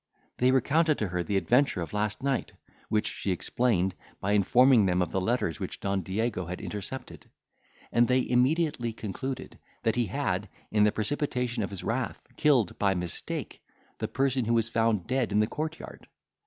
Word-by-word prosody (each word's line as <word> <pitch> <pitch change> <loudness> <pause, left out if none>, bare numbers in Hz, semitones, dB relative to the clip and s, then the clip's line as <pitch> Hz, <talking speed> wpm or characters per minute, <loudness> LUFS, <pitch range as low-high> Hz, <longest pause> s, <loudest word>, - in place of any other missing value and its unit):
They 125 - +4
recounted 150 +4 +3
to 105 - -1
her 90 0 -1
the 100 +3 0
adventure 125 +2 +2
of 85 - -5
last 105 +3 -1
night, 135 -2 -1 0.4
which 105 0 +1
she - - -3
explained, 95 -1 +1 0.3
by 100 - -1
informing 115 +2 +5
them 90 0 +2
of 90 -2 0
the 95 - 0
letters 95 -6 0
which - - -5
Don 100 -1 -1
Diego 95 0 -2
had 90 +1 -5
intercepted. 105 +6 -7 0.6
And 120 0 +4
they 130 0 +2
immediately 125 -1 +1
concluded, 130 +5 -5 0.2
that 115 -2 +2
he 120 -2 +2
had, - - -1 0.2
in 105 -1 +4
the 105 - +4
precipitation 125 0 -1
of 100 - -2
his 100 -2 -7
wrath, - - -2
killed, 130 -11 +2
by 100 -2 +2
mistake, 90 -1 -4 0.4
the - - -1
person 130 -1 0
who 115 +1 +2
was 115 -1 +1
found 115 -4 +1
dead 125 -2 0
in 105 - +3
the 105 - +4
court 155 +7 -4
yard. - - -11
115 Hz, 180 wpm, -28 LUFS, 100-130 Hz, 0.6 s, informing